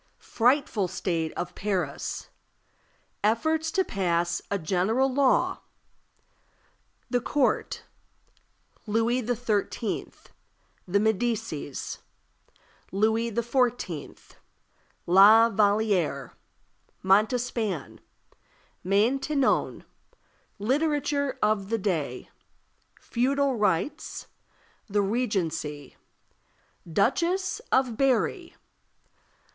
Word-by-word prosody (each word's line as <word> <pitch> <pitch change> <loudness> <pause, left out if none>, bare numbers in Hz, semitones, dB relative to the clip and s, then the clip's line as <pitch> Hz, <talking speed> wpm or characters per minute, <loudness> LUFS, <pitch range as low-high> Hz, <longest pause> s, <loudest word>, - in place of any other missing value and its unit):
Frightful 245 -5 +1
state 175 -3 -2
of 175 0 -5
Paris. 185 -8 -3 0.9
Efforts 315 +9 +1
to 380 +4 +1
pass 175 - -1
a 200 - 0
general 200 +10 +1
Law. 275 -1 +2 1.5
The 245 -1 +1
Court. 270 +2 0 1.0
Louis 230 +4 +1
XIII. 225 -2 -2 0.8
The 195 +3 +2
Medicis. 215 - -2 0.9
Louis 220 +4 +1
XIV. 235 - -1 0.8
La 215 +6 +7
Vallière. 200 -8 +1 0.7
Montespan. 215 - +1 0.8
Maintenon. 260 +9 +1 0.7
Literature 285 +4 0
of 210 -2 +1
the 230 - +1
Day. 160 - -2 0.7
Feudal 270 +2 0
Rights. 210 - -1 0.6
The 205 -1 +1
Regency. 170 - -2 1.0
Duchess 345 - +1
of 250 -4 +2
Berri. 275 - 0
220 Hz, 65 wpm, -27 LUFS, 190-255 Hz, 1.5 s, La